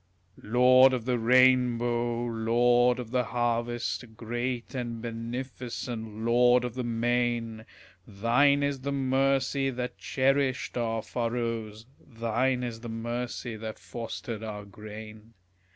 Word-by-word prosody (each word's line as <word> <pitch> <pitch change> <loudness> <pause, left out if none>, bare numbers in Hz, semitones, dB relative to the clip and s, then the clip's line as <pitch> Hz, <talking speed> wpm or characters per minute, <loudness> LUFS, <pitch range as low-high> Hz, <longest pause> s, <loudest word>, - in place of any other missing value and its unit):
Lord 130 +3 +6
of 120 -3 -2
the 125 -1 0
rainbow, 120 -1 +3
lord 120 +2 +3
of 120 -3 -7
the 125 -1 +1
harvest, 120 +1 -1
Great 120 +1 -3
and 120 -3 -4
beneficent 115 -1 -5
lord 120 +1 +4
of 125 -2 -3
the 125 0 -3
main! 120 -1 -1 0.4
Thine 125 +8 +3
is 140 -1 -1
the 140 +2 -3
mercy 135 0 +1
that 125 -1 -5
cherished 135 0 0
our 115 -2 -1
furrows, 115 -2 -3 0.2
Thine 125 +2 -1
is 120 -2 -4
the 115 0 -8
mercy 120 +1 -4
that 110 0 -6
fostered 110 -1 -6
our 105 -2 -6
grain. 110 +2 -11
120 Hz, 120 wpm, -28 LUFS, 115-125 Hz, 0.4 s, Lord